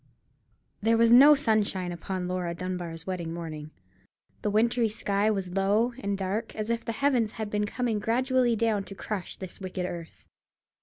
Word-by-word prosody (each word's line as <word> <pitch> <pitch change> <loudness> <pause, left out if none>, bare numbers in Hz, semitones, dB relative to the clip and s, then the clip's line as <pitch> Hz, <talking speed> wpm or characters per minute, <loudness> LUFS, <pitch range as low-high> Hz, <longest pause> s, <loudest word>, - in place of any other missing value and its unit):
There 225 +2 +3
was 230 0 +4
no 280 +5 +9
sunshine 210 -8 0
upon 180 +1 -4
Laura 180 -2 -2
Dunbar's 175 -2 -5
wedding 180 -3 -3
morning. 155 -3 -6 0.7
The 210 - 0
wintry 230 +2 +2
sky 205 0 0
was 195 -4 -2
low 205 +6 +2
and 200 -5 -2
dark, 195 +3 -3
as 215 +1 -2
if 230 0 -1
the - - -3
heavens 240 -3 +1
had 215 -2 -5
been 210 0 0
coming 230 -1 -1
gradually 250 +2 +2
down 220 -2 +1
to 195 - -9
crush 195 -2 -5
this 190 +1 -9
wicked 185 -1 -3
earth. 170 -2 -8
205 Hz, 165 wpm, -28 LUFS, 185-230 Hz, 0.7 s, no